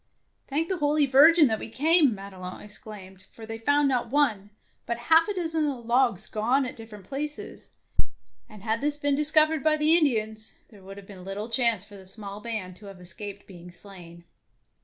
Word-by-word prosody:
" - - -47
Thank 305 +4 -1
the 375 -1 -3
Holy 295 0 +2
Virgin 300 +5 +6
that 220 -4 0
we - - -7
came," 295 0 +3
Madelon 190 -2 -9
exclaimed; 195 -3 -11
for 225 - -11
they 225 0 -7
found 285 +5 +2
not 245 -3 0
one, 230 -8 +1 0.4
but 235 - -2
half 320 +7 +4
a 415 - -2
dozen 325 -3 -1
of 280 - -2
the - - -11
logs 235 -4 +1
gone 245 +6 0
at 255 - -6
different 215 -4 -12
places, 295 +6 -6 0.8
and 210 -3 -13
had 220 0 -1
this 290 0 0
been 285 -1 0
discovered 305 +1 +4
by 310 -1 +3
the 305 +2 +4
Indians, 220 -9 0 0.2
there 210 -4 -17
would 195 +1 -11
have 200 - -11
been 190 -2 -12
little 200 +4 -6
chance 230 -5 +1
for 205 - -13
the 190 -1 -14
small 200 0 -8
band 210 -6 -5
to 205 - -13
have 195 -2 -11
escaped 200 +3 -8
being 180 -2 -13
slain. 175 -2 -13
225 Hz, 200 wpm, -26 LUFS, 200-290 Hz, 0.8 s, Virgin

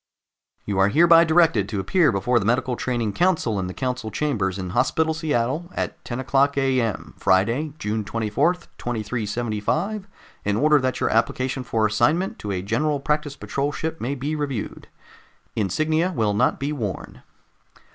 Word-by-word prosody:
"'You 100 -2 -1
are 95 - +5
hereby 165 +8 +6
directed 160 - +3
to 105 -3 -2
appear 155 - +3
before 120 +4 +1
the 100 - -3
medical 125 +2 +1
training 120 -4 -2
council 165 - +1
in 95 - -2
the 90 - -5
council 125 -3 -3
chambers 105 -7 -1
in 95 -2 -5
Hospital 155 - +1
Seattle 155 +1 -1
at - - -4
10:00 135 +3 +1
A.M., 130 -6 0
Friday, 115 +11 +2
June 105 -2 -2
24, 115 - 0 0.2
2375, 120 - -2 0.4
in 105 0 0
order 150 +2 +4
that 130 -1 -1
your - - +1
application 130 +3 0
for 115 -3 0
assignment 120 - +1
to 105 - -6
a 90 -2 -2
General 150 +8 0
Practice 150 0 -1
Patrol 140 0 -2
ship 160 +2 -4
may 135 +4 -2
be 145 +4 -3
reviewed. 140 -7 -4 0.7
Insignia 155 - +1
will 105 -3 +1
not 120 +5 +1
be 140 +2 -2
worn. 110 -10 -5
125 Hz, 155 wpm, -23 LUFS, 105-150 Hz, 0.7 s, hereby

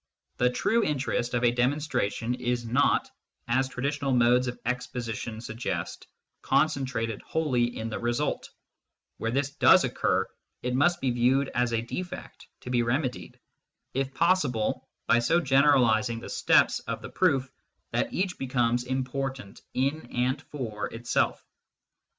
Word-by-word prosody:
The 125 - +3
true 220 - +1
interest 130 -6 -1
of 120 - 0
a 120 - +5
demonstration 125 -3 0
is 120 -1 -2
not, 115 +2 +2 0.4
as 130 +3 +1
traditional 140 +1 -2
modes 125 +1 +4
of 125 - -4
exposition 120 -2 -3
suggest, 115 +1 -4 0.3
concentrated 130 -8 0
wholly 125 -7 0
in 110 - -3
the 110 - -4
result; 120 0 -1 0.7
where 115 - -2
this 135 +3 0
does - - +6
occur, - - 0 0.4
it 125 0 -1
must 155 +7 +2
be 130 - +1
viewed 130 +3 +2
as 120 -1 0
a 115 0 0
defect, 180 +9 -7
to 125 - -7
be 120 -1 +3
remedied, 125 - -2 0.5
if 135 0 -1
possible, 135 -7 +1 0.2
by 120 - +4
so 145 +9 +3
generalising 130 -6 +3
the - - -9
steps - - +3
of - - -4
the - - -6
proof 135 -1 +1 0.4
that - - 0
each 185 0 -2
becomes 125 -2 0
important 130 -3 -4
in 135 +1 -1
and 130 +3 0
for 115 -9 -5
itself. 115 +1 -1
125 Hz, 140 wpm, -27 LUFS, 120-135 Hz, 0.7 s, does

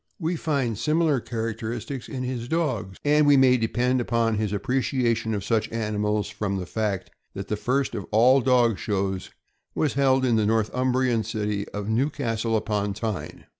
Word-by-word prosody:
* - - -45
We 165 -1 -1
naturally 170 - -4
find 135 -8 0
similar 155 +2 +2
characteristics 115 +3 -4
in 130 -2 -4
his 125 -2 -4
dogs, 130 - -1
and 150 0 +4
we 145 -1 +6
may 130 -1 +6
depend 125 +3 +1
upon 115 -1 +1
his 105 -1 -1
appreciation 115 0 0
of 100 - -3
such 110 0 0
animals 105 -2 -1
from 105 -1 -3
the 90 - -4
fact 95 -5 -2 0.2
that 100 0 -6
the 105 - 0
first 130 +6 0
of 100 -5 -5
all 125 +5 +5
dog 120 -4 +3
shows 95 -2 -2 0.5
was 150 - +1
held 135 -1 +3
in 120 -3 +3
the 110 - +2
Northumbrian 125 +2 +1
city 105 -2 -2
of 105 0 -5
Newcastle 115 -2 0
upon 105 -2 -1
Tyne. 110 -4 -5
115 Hz, 170 wpm, -25 LUFS, 105-130 Hz, 0.5 s, we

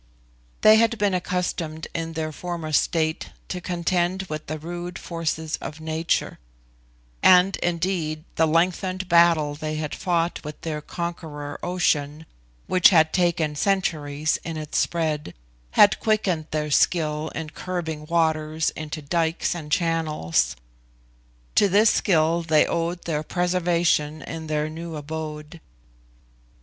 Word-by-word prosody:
They 215 0 +8
had 230 +1 +3
been 205 -2 +1
accustomed 175 -3 -2
in 165 -1 -3
their 155 -1 -3
former 170 -1 -5
state 160 +1 +1 0.2
to 180 - -4
contend 175 +1 0
with 155 -4 -6
the 155 - -3
rude 175 +3 -6
forces 160 -2 -3
of 155 - -8
nature; 160 +1 -1 0.8
and 185 +1 +6
indeed 170 -3 -1
the 160 - +2
lengthened 185 +3 0
battle 170 -4 +4
they 155 +1 -4
had 155 -1 -3
fought 170 -2 -1
with 150 0 -8
their 155 -2 -4
conqueror 155 -4 -6
Ocean, 155 -4 0 0.4
which 185 -1 +6
had 160 -4 +4
taken 170 -4 +1
centuries 155 -5 0
in 165 -2 -5
its 155 -1 -2
spread, 155 - -1 0.4
had 205 - +6
quickened 190 -8 0
their 150 -1 -2
skill 155 0 +2
in 160 -1 -5
curbing 160 -4 -5
waters 160 -1 +1
into 155 0 -6
dikes 165 +2 0
and 155 -4 -8
channels. 160 - +1 1.0
To 205 - +4
this 210 +4 +5
skill 165 -3 +2
they 160 -2 +3
owed 170 +1 -2
their 150 -3 -1
preservation 170 -3 0
in 160 -1 -6
their 150 0 0
new 165 +1 -7
abode. 155 +1 -6
165 Hz, 130 wpm, -24 LUFS, 155-175 Hz, 1.0 s, They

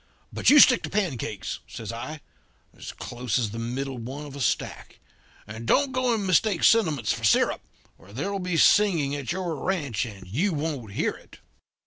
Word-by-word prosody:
But - - +2
you 295 - +8
stick 250 -3 +7
to - - -5
pancakes,' 145 - -3
says 110 -1 -7
I, 145 +7 -7 0.5
'as - - -8
close 125 -1 -3
as 115 -5 -1
the 115 - -6
middle 130 +3 -4
one 135 +6 -7
of 140 -1 -10
a 140 - -6
stack; 105 - -2 0.5
and 110 +2 -8
don't 280 - +3
go 255 -1 0
and 205 -3 -3
mistake 185 +1 +2
sentiments 155 - +3
for 115 - -7
syrup, 105 - +3 0.4
or 100 - -17
there'll 195 - -3
be 180 -2 -2
singing 165 -8 +4
at 140 0 -4
your 180 -2 -3
ranch, 140 - -2
and 100 -4 -11
you 160 - -1
won't 145 -9 -4
hear - - 0
it.' - - -15
145 Hz, 180 wpm, -25 LUFS, 115-185 Hz, 0.5 s, you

